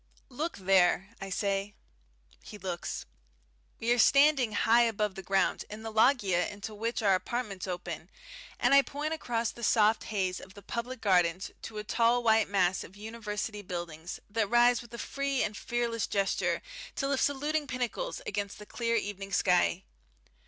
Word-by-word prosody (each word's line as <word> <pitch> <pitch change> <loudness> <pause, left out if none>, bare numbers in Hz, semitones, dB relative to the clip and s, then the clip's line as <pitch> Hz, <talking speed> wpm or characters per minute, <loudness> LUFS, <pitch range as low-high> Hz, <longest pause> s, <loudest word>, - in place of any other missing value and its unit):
"Look 305 +6 -3
there!" 190 0 +3
I 195 - -5
say. 200 +1 -1 0.7
He 210 - -10
looks. 180 -3 -4 0.7
We 230 +1 0
are 240 - 0
standing 275 -2 +5
high 230 +3 +4
above 215 -3 +1
the 190 - -7
ground 195 +1 +1
in 215 +1 -8
the 225 - -5
loggia 215 -6 +3
into 205 +2 -7
which 230 +2 -2
our 200 -2 +5
apartments 200 -1 -2
open, 175 -2 -5 0.5
and - - +3
I 275 - +9
point 295 +3 -3
across 235 -7 -1
the 235 - -12
soft 220 -1 +3
haze 190 -4 -1
of 190 - -13
the 200 - -12
public 235 +1 -5
gardens 180 -2 +2
to 220 - -8
a 210 - -3
tall 235 +3 +2
white 220 -2 +4
mass 190 -2 +2
of 185 - -13
University 210 -1 -5
buildings 175 -3 -6
that 215 -1 -1
rises 240 +1 +5
with 235 -1 -15
a - - -7
free 275 +1 -1
and 210 - -2
fearless 235 -1 -1
gesture, 195 -1 0 0.3
to 275 - -1
lift 275 -1 +1
saluting 295 +2 0
pinnacles 255 - -3
against 200 0 -3
the 210 - -10
clear 230 +1 -1
evening 200 -2 -3
sky. 180 -1 +2
215 Hz, 165 wpm, -30 LUFS, 195-240 Hz, 0.7 s, I